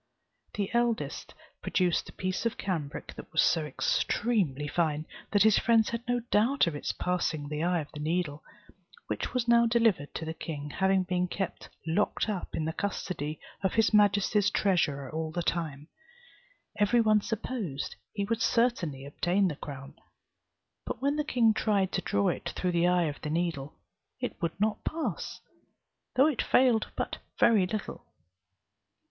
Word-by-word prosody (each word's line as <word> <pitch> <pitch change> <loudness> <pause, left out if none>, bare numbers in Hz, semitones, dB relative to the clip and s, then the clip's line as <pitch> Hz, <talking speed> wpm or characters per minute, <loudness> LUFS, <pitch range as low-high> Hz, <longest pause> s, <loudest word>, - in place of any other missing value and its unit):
The 200 -2 -2
eldest 235 -1 -1 0.3
produced 180 -3 +1
a - - -11
piece 185 0 -2
of 230 - -4
cambric 160 -7 -4
that - - -11
was - - +4
so 160 -2 +2
extremely 150 - 0
fine, 155 -1 0 0.2
that 205 -1 +4
his 220 -1 +5
friends 225 -2 +3
had 235 0 -3
no 245 0 +1
doubt 235 +6 +4
of 165 -3 -2
its 145 - -2
passing 165 -5 -1
the 150 0 -3
eye 175 -1 +2
of 150 - -10
the 150 - -7
needle, 155 -1 -1 0.6
which - - -4
was 245 -1 0
now 235 0 +5
delivered 225 -11 +2
to 160 - -4
the 160 - -3
king, 150 -3 -6
having 190 +1 +2
been 180 0 0
kept 190 0 -4 0.2
locked 175 +8 +1
up 205 -4 -3
in 155 - -1
the 160 - -2
custody 160 -6 -3 0.2
of 190 -2 0
his 225 -1 +3
majesty's 205 0 +4
treasurer 150 -10 +1
all 160 0 -3
the 175 +1 -2
time, 155 -4 -2 0.9
Every 210 +4 +4
one 215 -2 +4
supposed 210 - -4 0.2
he 200 -2 -2
would 230 +2 -1
certainly 180 - +1
obtain 180 +6 +1
the 150 - -4
crown. 140 -1 -8 0.9
But - - -5
when 280 +2 +1
the 300 - 0
king 235 -6 +3
tried 205 -3 +1
to - - -1
draw 100 0 +1
it - - -3
through 180 - 0
the 170 0 +3
eye 180 0 +3
of 150 -2 -4
the 150 - -4
needle, 160 -4 -2 0.4
it - - -5
would 170 +2 -2
not 210 0 0
pass, 325 0 -3 0.7
though 265 - +6
it 300 -6 +1
failed 245 -4 +3
but - - -3 0.2
very 210 -6 +5
little. 215 +1 -5
185 Hz, 165 wpm, -29 LUFS, 160-220 Hz, 0.9 s, though